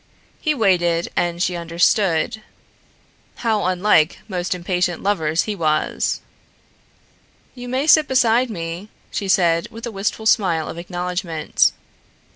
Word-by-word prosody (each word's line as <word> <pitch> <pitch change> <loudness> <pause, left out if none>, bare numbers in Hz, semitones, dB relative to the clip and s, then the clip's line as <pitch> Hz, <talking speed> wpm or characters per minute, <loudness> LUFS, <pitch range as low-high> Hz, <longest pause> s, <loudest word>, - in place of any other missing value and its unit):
He 310 -2 +1
waited 175 -7 +2
and 175 0 0
she 180 - -1
understood. 170 +3 +1 0.9
How 220 -5 0
unlike 180 -3 +3
most 180 -2 -2
impatient 180 0 -1
lovers 165 -5 +1
he 215 - -3
was! 155 -4 0 1.3
"You 245 -1 -8
may 260 +3 0
sit 310 -1 +6
beside 250 -1 +3
me," 170 0 -6 0.2
she 200 - -3
said 170 -3 +2
with 230 +1 -8
a 235 - -5
wistful 210 +2 -3
smile 175 -7 +2
of 170 - -6
acknowledgment. 175 -2 0
180 Hz, 120 wpm, -20 LUFS, 170-220 Hz, 1.3 s, sit